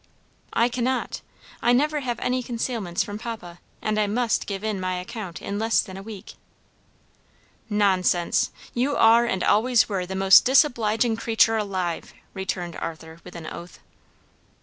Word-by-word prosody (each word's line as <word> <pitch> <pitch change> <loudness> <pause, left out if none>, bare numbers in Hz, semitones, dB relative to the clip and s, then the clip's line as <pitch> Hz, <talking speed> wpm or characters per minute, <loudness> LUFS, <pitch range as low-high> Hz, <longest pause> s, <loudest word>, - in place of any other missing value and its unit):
"I 235 - +3
cannot; 250 +1 -2 0.4
I 240 - +3
never 300 +4 +2
have 245 -4 -3
any 255 0 0
concealments 230 -7 -2
from 205 0 -7
papa, 200 -7 -7 0.2
and 215 0 0
I 210 - +2
must 230 +2 0
give 195 0 -4
in 215 -3 -2
my 185 0 -2
account 180 -1 -7
in 200 +1 -3
less 225 +1 +2
than 190 - -3
a 195 - -7
week." 210 -1 -10 1.4
"Nonsense! 190 -4 +2 0.2
You 265 +4 0
are 230 +1 +6
and 190 -5 -1
always 235 +2 +3
were 190 -4 -2
the 190 - -5
most 190 0 +7
disobliging 240 -4 +3
creature 225 0 +3
alive!" 185 -5 -3 0.2
returned 185 -3 -4
Arthur 160 0 -7
with 180 - -12
an 165 -2 -8
oath. 170 +2 -9
210 Hz, 150 wpm, -24 LUFS, 185-235 Hz, 1.4 s, most